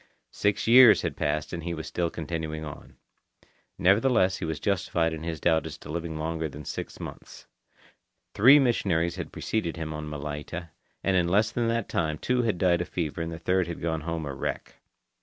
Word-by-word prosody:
Six 105 -1 0
years 120 -1 +8
had - - -2
passed 75 +2 -2
and 85 - -3
he 85 0 -3
was 80 - -6
still 85 -1 -1
continuing 80 -1 -4
on. 75 - -10 0.8
Nevertheless 100 0 +3
he 90 - -4
was 80 -1 -3
justified 85 -4 0
in 80 - -6
his 80 -1 -4
doubt 80 -2 +2
as 75 - -8
to - - -10
living 80 -1 -4
longer 80 0 -2
than 75 0 -10
six - - -6
months. - - -9 0.9
Three 130 +8 +8
missionaries 95 - +1
had 90 - -5
preceded 90 -7 -2
him 80 -1 -4
on 75 0 -5
Malaita, 75 +3 -6 0.3
and 95 - +2
in 90 -2 +3
less 105 +4 +2
than 120 -1 0
that 115 -2 0
time 80 -2 -1
two 125 +9 0
had 110 -6 0
died 90 -1 +2
of 90 - -5
fever 80 -2 -3
and 80 0 -3
the 80 - -6
third 90 +1 +1
had 85 - -5
gone 80 -1 -2
home 80 0 -3
a 70 - -4
wreck. - - -5
85 Hz, 195 wpm, -27 LUFS, 80-95 Hz, 0.9 s, years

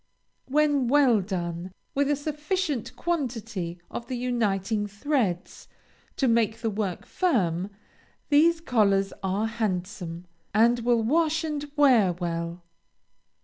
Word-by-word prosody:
When 290 -2 +2
well 255 -5 +4
done, 175 -1 -4 0.2
with 280 0 +1
a 290 - +3
sufficient 300 - -2
quantity 225 - -3
of 235 - -6
the 255 - -3
uniting 215 -4 0
threads, 205 - -2 0.5
to 270 - +2
make 230 -1 +2
the 225 - 0
work 200 -3 -3
firm, 190 - 0 0.6
these 325 +3 +4
collars 200 -8 +2
are 195 +3 0
handsome, 185 -6 -3 0.3
and 235 +2 +5
will 235 -1 +2
wash 320 +6 +2
and 295 -2 -4
wear 245 -11 +5
well. 170 0 -4
230 Hz, 115 wpm, -26 LUFS, 195-285 Hz, 0.6 s, and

